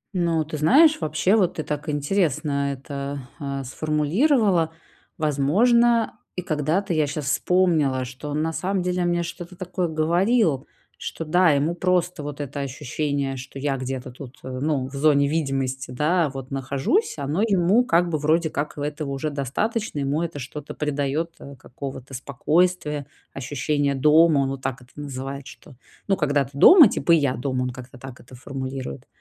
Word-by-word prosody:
Ну, 170 -3 +1
ты 155 0 -5
знаешь, 295 - +5
вообще, 155 +6 +2
вот 185 -5 +2
ты 155 - -3
так 150 +1 -4
интересно 145 -2 0
это, 140 +1 -6 0.2
а, 140 -2 -4
сформулировала. 165 - +1 0.5
Возможно, 220 - +2 0.2
и 180 - -3
когда-то 165 +5 0
я 155 -2 +2
щас 145 0 -4
вспомнила, 150 -4 +2
что 130 +4 -8
он 150 +1 -1
на 160 0 -2
самом 185 +2 -1
деле 180 0 0
мне 175 0 +1
что-то 175 +1 -8
такое 180 0 -3
говорил, 170 - +1 0.3
что 165 - -5
да, 175 +3 +4
ему 145 +3 +2
просто 180 -1 0
вот 145 0 -6
это 140 0 -5
ощущение, 140 0 -3
что 130 +2 -9
я 140 0 -1
где-то 130 -1 -5
тут, 130 +1 -11
э, - - -7
ну, 140 -3 0
в 135 - -13
зоне 140 0 +3
видимости, 135 -4 -2
да, 150 +5 +1
вот 135 -1 -8
нахожусь, 135 - 0
оно 145 +6 -1
ему, 200 +1 +3
как 175 -6 +2
бы, 155 -2 -1
вроде 160 +2 +1
как, 150 +1 -3
и - - -5
этого 150 0 -3
уже 140 +3 -3
достаточно. 150 - -2
Ему 140 +2 0
это 170 -3 -4
что-то 145 +2 -7
придаёт, 150 +2 -1
а, 140 - -10
какого-то 130 +1 -9
спокойствия, 150 +2 0 0.3
ощущение 140 +1 -1
дома. 150 +2 +5
Он 135 - 0
вот 135 -1 -5
так 130 -1 -4
это 125 - -22
называет 140 -1 -6
что: - - -14 0.3
"Ну, 195 - +3
когда 145 -3 +1
ты 135 +3 -16
дома, 310 - +9
типа, 170 - +1
и - - +7
я 140 -4 +1
дома"- 130 0 -2
он 125 - -2
как-то 130 +1 -11
так 130 0 -10
это 125 +2 -14
формулирует. 130 0 -6
150 Hz, 170 wpm, -23 LUFS, 135-170 Hz, 0.5 s, дома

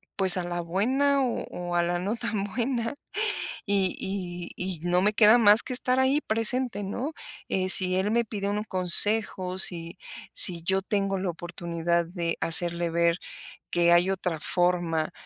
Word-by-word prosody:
pues, 190 -2 +5
a 180 - -3
la 175 0 -5
buena, 260 +11 -1
o 245 - -4
o, 175 0 -7
a 175 - +1
la 175 0 -3
no 200 +5 -4
tan 230 -4 -5
buena, 235 +3 -4 0.7
y 195 -3 -1
y 180 -3 -7
y 180 -3 -6
no 175 +2 -1
me 210 +2 +1
queda 215 +2 +4
más 210 -1 +5
que - - -8
estar 255 +1 0
ahí 265 +3 +1
presente, 225 -1 -2
¿no?, 255 +10 -6 0.4
eh, 185 0 -2
si 185 -1 +4
él 195 +3 -2
me 235 +1 0
pide 200 -2 -6
un 210 +1 -4
consejo, 185 0 +4
si 170 -1 0 0.4
si 170 -2 +7
yo 190 +2 -1
tengo 195 -1 -3
la 185 -1 -4
oportunidad 170 0 -4
de 170 -1 -5
hacerle 170 0 +5
ver 170 0 0 0.5
que 170 0 +1
hay 175 +2 +2
otra 180 -4 -4
forma 175 -2 -2
190 Hz, 170 wpm, -24 LUFS, 175-215 Hz, 0.7 s, si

